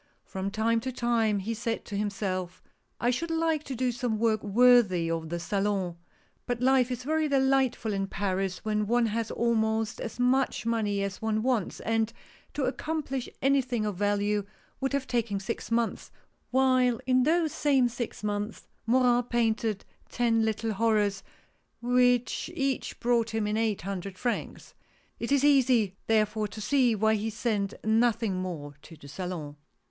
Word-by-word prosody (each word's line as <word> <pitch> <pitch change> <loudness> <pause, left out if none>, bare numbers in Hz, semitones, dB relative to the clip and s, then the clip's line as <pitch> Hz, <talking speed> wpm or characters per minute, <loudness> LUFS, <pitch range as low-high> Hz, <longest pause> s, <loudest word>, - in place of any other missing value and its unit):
From 190 +1 -4
time 225 +2 +1
to 260 +3 -4
time 235 -4 +1
he 205 +4 -3
said 230 0 -3
to 205 - -6
himself: 195 -3 -3 0.2
" - - -46
I 240 - +2
should 330 +7 -2
like 325 -2 0
to 265 - -5
do 250 +1 0
some 240 -2 -2
work 220 -1 +1
worthy 210 -6 +4
of 165 -1 -3
the 170 +1 -3
Salon; 195 -1 -1 0.3
" - - -39
but 245 -1 -1
life 260 0 +3
is 250 0 -4
very 310 +2 +1
delightful 265 -5 +2
in 195 0 -1
Paris 195 -1 -2
when 210 -1 0
one 240 +1 +3
has 225 0 -2
almost 220 -1 0
as - - -6
much 255 0 +1
money 210 -3 0
as 195 -1 -4
one 220 0 0
wants; 245 -7 0
and 225 0 0 0.4
to 290 - -1
accomplish 270 0 -2
any 275 0 +4
thing 240 -4 -2
of 210 -2 -2
value 205 +1 +1 0.4
would 270 0 -1
have 280 -1 0
taken 230 -5 -1
six 200 +4 -5
months, 230 0 -1 0.4
while 255 -2 +3
in 255 -1 +3
those 320 +3 +2
same 275 -4 +2
six 240 -2 -5
months 210 +1 -3 0.2
Morin 245 0 +4
painted 225 -3 -1 0.2
ten 230 -2 +1
little 220 0 -1
horrors, 210 -2 +1 0.6
which 245 +3 +2
each 275 -4 -2
brought 230 -2 +1
him 220 -1 0
in 210 +1 -1
eight 220 -5 0
hundred 195 0 -5
francs. 240 +3 -4 0.5
It 235 - -3
is 280 -1 +3
easy, 255 -8 +4
therefore, 215 -1 +1
to 210 +2 -10
see 245 +1 +2
why 220 +1 +2
he 220 +1 -1
sent 215 -3 -2
nothing 225 -2 +2
more 155 -6 -5
to 165 - -13
the 145 -2 -14
Salon. 155 -2 -6
225 Hz, 165 wpm, -28 LUFS, 205-250 Hz, 0.6 s, worthy